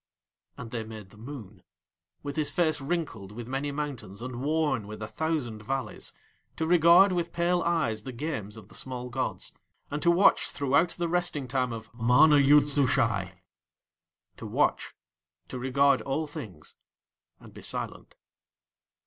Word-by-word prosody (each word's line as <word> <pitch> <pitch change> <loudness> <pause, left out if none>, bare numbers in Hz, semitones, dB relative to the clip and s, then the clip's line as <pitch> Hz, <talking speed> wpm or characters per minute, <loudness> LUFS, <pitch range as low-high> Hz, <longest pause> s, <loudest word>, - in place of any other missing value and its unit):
And 115 -2 -8
They 115 -2 -3
made 110 -3 -10
the 105 - -17
Moon, 110 -6 -9 0.6
with 145 -1 -5
his 150 -2 +1
face 160 -4 +1
wrinkled 135 - -3
with 115 +2 -8
many 135 +3 -2
mountains 135 -9 -5
and 125 0 -6
worn 145 -6 0
with 105 0 -8
a - - -4
thousand 150 -8 -2
valleys, 130 0 -4 0.4
to 160 - -1
regard 175 +3 +6
with 170 -1 -1
pale 175 +1 +1
eyes 155 -12 0
the 130 - -7
games 120 -6 -5
of 105 -3 -12
the - - -16
small 125 -1 -5
gods, 130 +1 -3 0.4
and 145 +1 -2
to 170 - +3
watch 175 +4 +4
throughout 140 +5 +2
the 175 -1 -1
resting 175 -5 -1
time 125 -1 0
of 115 0 -8
MANA 125 +6 +5
YOOD 145 +1 +6
SUSHAI; 115 -9 +1 0.9
to - - -7
watch, - - 0 0.5
to 130 - -5
regard 140 +2 +3
all 145 +4 -2
things, 110 - -10 0.6
and - - -15
be - - -11
silent. - - -5
135 Hz, 155 wpm, -28 LUFS, 115-155 Hz, 0.9 s, regard